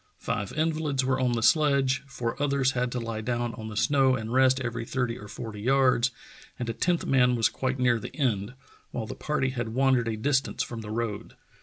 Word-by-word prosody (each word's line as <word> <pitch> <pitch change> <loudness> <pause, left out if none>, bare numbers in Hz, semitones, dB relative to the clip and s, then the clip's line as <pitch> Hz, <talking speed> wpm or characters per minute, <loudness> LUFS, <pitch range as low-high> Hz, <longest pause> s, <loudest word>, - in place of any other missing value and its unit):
Five 100 -1 -3
invalids 155 -4 0
were 130 0 +1
on 125 -2 +1
the 115 -1 -1
sledge, 140 -3 +3
four 120 -4 -3
others 140 -2 +2
had 125 -1 -1
to 125 - -1
lie 115 -2 -4
down 120 0 -2
on 110 -1 -7
the 105 -1 -6
snow 135 -1 +3
and 110 -1 -4
rest 130 0 +4
every 120 -2 -3
thirty 125 0 -2
or 105 - -10
forty 105 0 -7
yards, 130 0 +3 0.5
and 120 - -4
a 115 - -1
tenth 175 +7 0
man 125 -2 +3
was 115 -2 +3
quite 130 0 -2
near 125 -2 +2
the - - -8
end, 120 -5 -1 0.3
while 115 - -4
the - - -6
party 150 -3 -1
had 120 -3 -4
wandered 130 -3 +3
a 110 -1 -2
distance 135 +3 0
from 115 -2 -6
the 105 - -8
road. 110 -2 -4
125 Hz, 210 wpm, -27 LUFS, 115-135 Hz, 0.5 s, rest